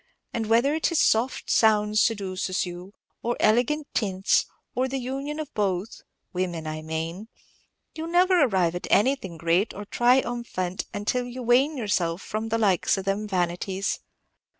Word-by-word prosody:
And 225 -2 -2
whether 235 +6 +3
it 320 +2 0
is 335 - +2
soft 235 +4 +2
sounds 215 -1 +4
seduces 190 -4 0
you, 180 +3 -9 0.3
or 240 +1 -1
elegant 245 +8 +2
tints, 195 -2 +1 0.3
or 255 +1 0
the 270 +1 -3
union 275 +4 -4
of 305 -3 -6
both, 195 -1 -2 0.3
women, 175 -3 -2
I 155 0 -4
mane, 165 +6 -4 0.7
you 320 - -5
'll - - -6
never 360 0 +4
arrive 185 -9 +2
at 175 - -5
anything 210 -7 +2
great 170 +6 +1
or 205 - -7
tri 245 +5 +4
um 240 -1 -4
phant 185 -5 -3 0.2
till 250 +3 0
you 250 +1 -7
wane 260 +6 +3
yourself 190 -6 -1
away - - -13
from 220 +1 -2
the 225 - +1
likes 200 -4 +2
of 190 - -4
them 200 +2 -1
vanities. 185 +1 -1
215 Hz, 170 wpm, -25 LUFS, 185-250 Hz, 0.7 s, sounds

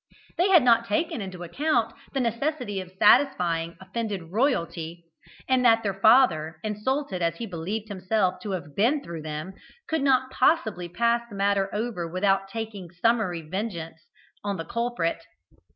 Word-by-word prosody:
They 360 +3 +2
had 355 -7 +7
not 230 -1 +4
taken 230 +3 -1
into 185 -2 -7
account 295 - 0 0.2
the 275 - -1
necessity 240 -3 -1
of 185 -1 -11
satisfying 180 -9 +3
offended 190 -3 -5
royalty, 170 - -1 0.4
and 260 -1 +3
that 225 -2 +5
their 200 -2 0
father, 195 -7 +4
insulted 215 0 -2
as 170 -1 +1
he 230 - -5
believed 200 +3 -4
himself 190 -1 0
to 205 -3 -4
have 150 -6 -6
been 260 +8 +2
through 170 -2 -7
them, 155 +4 -5 0.3
could 320 -2 0
not 260 -1 +2
possibly 220 - +1
pass 235 +5 +1
the 205 - -9
matter 200 0 +1
over 210 -5 -3
without 195 +1 +1
taking 210 -3 -6
summary 185 -1 0
vengeance 165 -2 -5 0.4
on 200 -1 -2
the 165 - -5
culprit. 235 -9 -2
205 Hz, 150 wpm, -26 LUFS, 175-235 Hz, 0.4 s, had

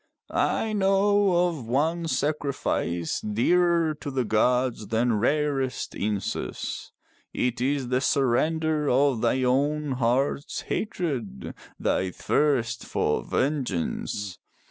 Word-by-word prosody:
I 220 -1 0
know 195 -2 +3
of 145 -9 -7
one 160 +7 0
sacrifice 140 - -1
dearer 165 +9 +2
to 145 - -4
the 130 -2 -1
gods 125 +1 +1
than 115 0 +1
rarest 140 +1 0
incense. 100 -1 -3 0.4
It 125 0 -1
is 135 -1 0
the 125 0 +1
surrender 150 +4 +1
of 130 -2 +3
thine 130 +2 +2
own 145 +3 +1
heart's 130 +3 0
hatred, 135 - -3 0.3
thy 95 - 0
thirst 120 +2 0
for - - 0
vengeance. 105 - -2
135 Hz, 100 wpm, -26 LUFS, 120-155 Hz, 0.4 s, know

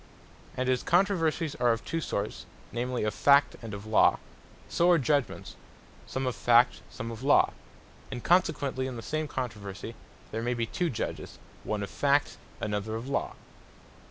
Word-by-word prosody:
And 130 0 0
as 130 -1 +2
Controversies 170 -4 +2
are 120 -1 +4
of 115 0 -2
two 165 - -2
sorts, 105 -7 -3 0.2
namely 125 +1 -2
of 105 -1 0
Fact, 140 +3 +4
and 115 -2 -7
of 100 +1 -7
Law; 110 0 +4 0.5
so 170 +1 +2
are 175 - +6
judgements, 140 -1 -1 0.5
some 130 0 -3
of 125 - -1
Fact, 120 +1 +4
some 115 -2 -6
of 115 0 -8
Law: 140 +2 +4 0.6
And 125 -3 -6
consequently 145 -7 +2
in 130 - -5
the 115 - -7
same 155 +4 -2
controversie, 105 -9 -5 0.4
there 110 - -3
may 120 +1 -1
be 115 -1 0
two 175 +9 -1
Judges, 125 - -5 0.3
one 105 -1 -2
of 100 - -6
Fact, 145 0 +2 0.2
another 105 +1 -2
of 115 +4 -5
Law. 140 - -1
125 Hz, 165 wpm, -29 LUFS, 115-145 Hz, 0.6 s, are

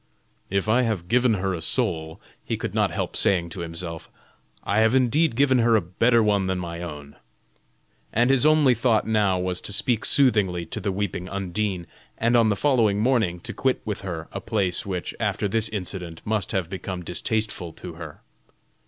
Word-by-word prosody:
"If 100 +2 -1
I 120 +4 +4
have 110 -8 -2
given 120 0 +3
her 95 0 -1
a 85 - -4
soul," 80 0 0 0.2
he - - -3
could - - -4
not - - +2
help - - -3
saying 85 -3 +2
to 85 - -8
himself, 85 0 -6 0.5
"I 100 - +1
have 110 +3 +4
indeed 130 +2 +2
given 130 -1 +3
her 115 -1 +4
a 110 - +4
better 115 +7 +2
one 100 -3 +2
than 95 0 -1
my 85 -1 -5
own;" 75 -4 -8 0.9
and 120 +4 +3
his 135 -3 +4
only 155 -4 +5
thought 115 -2 +2
now 105 -4 +2
was 90 0 -2
to - - -4
speak 115 +2 +1
soothingly 100 -11 +3
to 80 - -5
the 100 -1 -2
weeping 95 -2 -3
Undine, 95 -1 -2 0.3
and 115 +2 +2
on 115 -2 +5
the 105 - +2
following 115 -5 +2
morning 110 -7 +1
to 120 +5 -6
quit 130 -1 0
with 105 -2 -3
her 85 -4 -5
a - - -5
place 100 -5 -1
which, 90 -2 -3
after - - 0
this 110 +2 0
incident, 90 -5 -5
must 105 -2 -1
have 95 -4 -1
become 95 0 -5
distasteful 90 0 -2
to 90 - -9
her. 80 -2 -10
100 Hz, 190 wpm, -24 LUFS, 90-115 Hz, 0.9 s, only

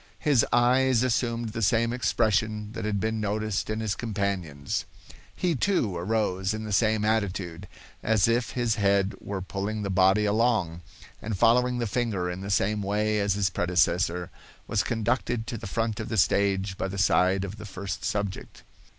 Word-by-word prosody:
His 140 -6 +3
eyes 125 0 +3
assumed 120 -2 0
the 115 +1 -5
same 115 +2 +2
expression 110 -2 0
that 110 - -5
had 105 -1 -1
been 110 +1 -1
noticed 105 0 -2
in 110 +1 -2
his 110 -3 -1
companion's. 100 -11 -3 0.5
He, 175 -2 0
too, 130 - 0
arose 95 +1 -1
in 110 - -5
the 105 -1 -4
same 110 0 +2
attitude, 95 -5 -1 0.3
as 110 -2 +3
if 115 +1 0
his 120 -2 0
head 100 0 +2
were 95 -2 -4
pulling 105 +3 -3
the 100 - -2
body 95 +3 +4
along, 105 -6 +1 0.4
and 105 -2 -3
following 125 +3 +3
the 120 - -1
finger 105 -6 -1
in 90 +1 -6
the 100 - -6
same 105 +2 +1
way 105 +2 0
as 100 -1 +1
his 100 -2 +1
predecessor, 90 -1 +1 0.3
was 100 - 0
conducted 120 +1 -1
to 120 - -5
the 105 - -7
front 110 +2 -2
of 110 - -5
the 110 - -2
stage 95 0 +1
by - - -1
the 95 +1 -6
side 95 0 +3
of 100 +2 -6
the 110 - -8
first 95 0 -6
subject. 100 -2 -4
105 Hz, 175 wpm, -27 LUFS, 95-115 Hz, 0.5 s, body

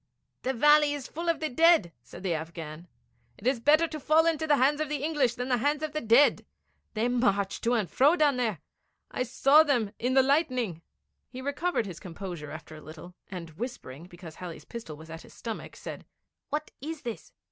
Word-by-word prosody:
'The 265 - -1
valley 295 +3 +5
is 275 -3 -7
full 335 +2 -4
of 335 - +1
the 315 - -1
dead,' 320 - +4
said 125 +9 -12
the 185 -3 0
Afghan. 160 0 -6 0.5
'It 200 - -14
is 255 -1 +2
better 305 +7 +4
to 310 -1 -6
fall 310 +3 +4
into 315 -1 +1
the 295 - +5
hands 285 +3 +2
of 310 - -2
the 290 -2 -3
English 290 -6 +1
than 250 +1 -4
the 250 -2 +2
hands 290 +5 0
of 310 -1 -3
the 305 - -2
dead. 235 +6 +4 0.5
They 220 +2 +1
march 205 -6 +1
to 235 - +1
and 215 -5 0
fro 285 - +4
below 295 -4 +3
there. 220 -10 -1 0.5
I - - -3
saw 275 +4 +5
them 250 -9 +1
in 250 +2 0
the 265 - +6
lightning.' 255 - +1 0.5
He 250 - -9
recovered 285 +1 -1
his 180 -4 -8
composure 175 -4 -7
after 155 0 -9
a 155 - -11
little, 160 +3 -11 0.2
and 175 -4 -7
whispering, 165 - -7
because 175 -2 -11
Halley's 175 0 -9
pistol 225 -11 -8
was 160 +1 -12
at 165 0 -8
his - - -16
stomach, 225 -2 -6
said: - - -8 0.4
'What 305 +1 -3
is 310 +1 -6
this? 235 -3 -6
245 Hz, 205 wpm, -28 LUFS, 180-295 Hz, 0.5 s, the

